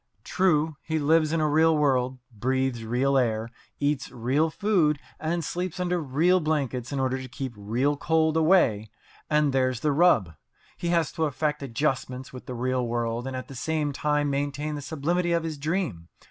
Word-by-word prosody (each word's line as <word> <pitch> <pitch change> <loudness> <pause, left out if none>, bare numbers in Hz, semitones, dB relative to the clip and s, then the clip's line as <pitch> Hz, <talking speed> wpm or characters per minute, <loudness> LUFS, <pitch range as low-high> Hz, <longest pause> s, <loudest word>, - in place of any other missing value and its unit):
True, 160 -5 +1
he 160 0 -2
lives 155 +1 +3
in 165 - +1
a 155 - +2
real 160 +1 +4
world, 130 -3 +1
breathes 130 +1 -1
real 130 +4 +2
air, 115 -2 0 0.3
eats 145 -1 0
real 135 +6 0
food, 170 -5 +2 0.2
and 165 0 -2
sleeps 180 +2 -3
under 180 -1 0
real 160 +6 +2
blankets, 140 -6 -1
in 140 - -2
order 130 0 0
to 130 - -7
keep 130 0 -6
real 120 +8 0
cold 160 +2 +1
away. 155 - +3 0.4
And 150 -2 +2
there's 130 -2 +1
the 150 - +2
rub. 140 - +3 0.4
He 175 - -4
has 170 -2 +1
to 160 -2 -1
effect 150 +1 -1
adjustments 130 -1 -2
with 125 - -10
the 125 - -5
real 130 +1 0
world 120 +1 -2
and 135 - -4
at 130 - -5
the - - -10
same 150 +2 -1
time 150 0 0
maintain 145 +2 -2
the 145 - -4
sublimity 170 +5 -1
of 170 -1 +1
his 155 -3 -4
dream. 150 - -2
145 Hz, 180 wpm, -26 LUFS, 130-160 Hz, 0.4 s, real